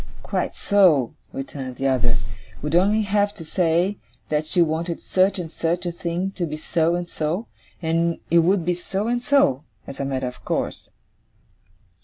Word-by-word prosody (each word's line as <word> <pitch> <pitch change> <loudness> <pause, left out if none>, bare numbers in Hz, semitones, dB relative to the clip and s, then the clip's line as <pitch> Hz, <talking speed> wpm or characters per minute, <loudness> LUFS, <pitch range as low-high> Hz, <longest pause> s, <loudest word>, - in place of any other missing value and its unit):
'Quite - - -2
so,' 175 - +4 0.2
returned 135 -1 -6
the 135 +2 -1
other, 125 -2 +2 0.2
' - - -21
would 150 +1 -2
only 205 +5 +4
have 205 0 +1
to 165 - -9
say, 175 +4 +1 0.3
that 155 0 0
she 180 - +1
wanted 165 +1 +1
such 190 +1 +2
and 170 -3 -5
such 170 +2 -1
a 175 - -1
thing 175 +2 -2
to 180 -3 -3
be 155 0 -4
so 165 +1 +1
and 175 0 -3
so; 165 +7 -2 0.4
and 165 +1 +1
it 170 - +6
would 175 +1 +3
be 180 - +2
so 195 +4 -3
and 240 +1 0
so, 250 - +3 0.2
as 140 - -9
a 140 - -1
matter 130 -1 -1
of 125 - -9
course. - - -3
170 Hz, 180 wpm, -23 LUFS, 155-190 Hz, 0.4 s, it